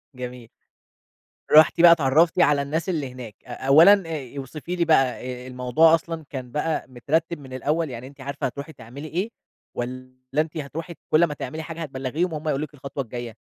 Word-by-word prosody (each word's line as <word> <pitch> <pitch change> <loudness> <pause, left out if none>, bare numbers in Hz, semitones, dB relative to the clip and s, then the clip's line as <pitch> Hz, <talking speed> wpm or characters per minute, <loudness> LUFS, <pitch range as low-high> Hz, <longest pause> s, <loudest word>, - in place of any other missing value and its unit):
جميل. 125 -2 -8 1.0
رُحتِ 160 +2 +7
بقى 175 - +9
اتعرّفتِ 165 +3 +4
على 145 -4 +4
الناس 160 +6 -2
اللي 145 -7 -2
هناك. 120 -4 -9
أ 125 - -8
أولًا 175 +8 +7
آآ 145 -4 -6
اوصفي 150 +6 -5
لي 175 -1 +1
بقى 155 -4 +5 0.4
آآ - - -9
الموضوع 130 +6 +4
أصلًا 165 -1 -5
كان 130 -3 -7
بقى 155 +1 -1
مترتّب 155 +7 -1
من 130 -2 -11
الأول، 150 +4 -1
يعني 125 +1 -7
أنتِ 140 0 -14
عارفة 140 +1 -4
هتروحي 140 +5 -8
تعملي 135 +6 -10
إيه؟ 185 +8 -2 0.4
والّا 130 +1 -5 0.3
أنتِ 160 0 -6
هتروحي 160 +4 -6 0.2
كل 155 +2 +5
أمّا 150 -3 +1
تعملي 155 +2 -6
حاجة 165 +1 -7
هتبلّغيهم 145 +4 -2
وهم 155 +1 -5
هيقولوا 150 0 0
لِك 150 - -19
الخطوة 140 0 -5
الجاية؟ 120 -1 -7
145 Hz, 180 wpm, -24 LUFS, 130-165 Hz, 1.0 s, بقى